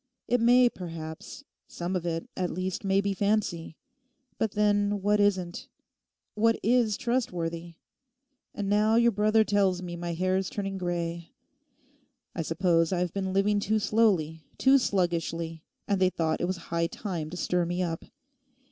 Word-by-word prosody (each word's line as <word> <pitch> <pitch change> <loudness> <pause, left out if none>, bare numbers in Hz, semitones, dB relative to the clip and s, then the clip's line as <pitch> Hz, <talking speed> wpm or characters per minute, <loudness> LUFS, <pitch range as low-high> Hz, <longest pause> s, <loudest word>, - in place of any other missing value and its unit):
It 245 0 +2
may 245 +1 +6
perhaps—some 165 - -7
of 175 -1 -2
it 165 -1 -3
at 180 -1 -1
least 185 +2 -3
may 195 0 +2
be 200 0 -1
fancy. 195 -6 -1 0.6
But 220 -2 0
then, 205 -1 +1
what 210 +1 +3
isn't? 185 -4 0 0.7
What 225 +2 +2
is 230 -2 +2
trustworthy? 170 -9 -2 0.8
And 205 - -3
now 210 +2 +3
your 235 0 +5
brother 215 +1 +3
tells 195 -3 +1
me 175 -1 -5
my 170 0 -4
hair's 185 +2 0
turning 195 -1 -4
grey. 170 -1 -3 1.0
I 170 - -3
suppose 165 +1 +1
I 185 - 0
have 175 -1 -1
been 190 -1 -2
living 200 +2 +2
too 215 +2 +1
slowly, 190 -8 +1
too 270 +1 +5
sluggishly, 170 -5 -1 0.3
and 200 -2 0
they 185 - +5
thought 160 -3 -1
it - - +1
was 185 +1 -2 0.2
high 170 0 +1
time 170 -6 -5
to 180 - -7
stir 180 -1 0
me 175 +1 -1
up. 165 -2 -3
185 Hz, 155 wpm, -28 LUFS, 170-210 Hz, 1.0 s, may